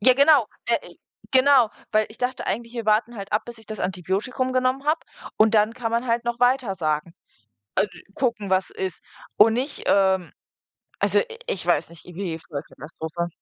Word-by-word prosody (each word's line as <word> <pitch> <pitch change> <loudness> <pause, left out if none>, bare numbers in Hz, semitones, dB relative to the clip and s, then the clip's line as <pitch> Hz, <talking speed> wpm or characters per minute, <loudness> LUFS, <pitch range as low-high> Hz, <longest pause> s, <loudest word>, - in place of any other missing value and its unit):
Ja, 255 +4 +6
genau 280 -3 +6 0.2
äh, - - +1
i - - -16 0.3
genau, 260 -2 +6 0.2
weil 215 0 +3
ich 215 - -14
dachte 255 +1 -2
eigentlich, 230 +4 -2
wir 230 -3 -4
warten 220 +2 +2
halt 200 0 -7
ab, 210 +1 +2
bis 240 -1 -9
ich 220 - -16
das 215 -1 -7
Antibiotikum 195 +8 -1
genommen 255 +1 +1
habe 310 +2 +2 0.4
und 220 +1 +4
dann 215 +1 +3
kann 235 -2 -3
man 235 +2 0
halt 235 0 0
noch 240 0 -2
weitersagen. 190 - +1 0.6
A 190 - +4
d 175 -4 -15
gucken, 230 -6 -1
was 185 0 +2
ist. 190 -2 -5 0.4
Und 220 +1 +7
nicht, 265 +4 -2
ähm 190 -2 +2 0.7
also, - - +3
i - - 0 0.2
ich 475 - -2
weiß - - +2
nicht, 170 -1 -15
irgendwie 175 -2 -5
Vollkatastrophe. 160 +2 -6
220 Hz, 185 wpm, -24 LUFS, 190-250 Hz, 0.7 s, Und